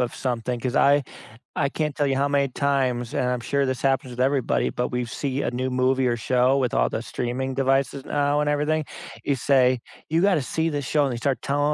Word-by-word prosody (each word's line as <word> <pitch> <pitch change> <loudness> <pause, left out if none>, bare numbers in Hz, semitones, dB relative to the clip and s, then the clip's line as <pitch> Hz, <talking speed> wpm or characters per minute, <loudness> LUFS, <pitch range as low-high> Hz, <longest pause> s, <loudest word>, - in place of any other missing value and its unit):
of 125 -2 -1
something, 125 -1 -2
'cause 125 +1 -3
I 145 +1 +5 0.5
I 140 - +1
can't 150 0 -2
tell 145 - 0
you 135 -1 0
how 140 +1 +1
many 140 -1 +2
times, 130 -3 0
and 125 - 0
I'm 125 -1 -1
sure 140 +4 0
this 130 -1 -3
happens 135 -1 +1
with 125 0 -7
everybody, 135 0 +1
but, 125 - -2
we've 125 -2 -3
see 140 +1 -2
a - - -1
new 125 +1 -2
movie 130 +1 +1
or 120 -1 +1
show 125 +3 +2
with 130 -3 0
all - - +2
the - - -4
streaming 130 +2 -3
devices 135 0 0
now 145 0 +1
and 150 - 0
everything, 150 +1 0 0.4
you 140 - +1
say, 130 -1 +3 0.3
"You 165 +2 +1
gotta 190 -7 +3
see 160 +5 -1
this 145 -3 -3
show," 150 0 +2
and 135 - -1
they - - -3
start 135 +2 -1
telling 145 +1 +1
135 Hz, 230 wpm, -24 LUFS, 125-145 Hz, 0.5 s, I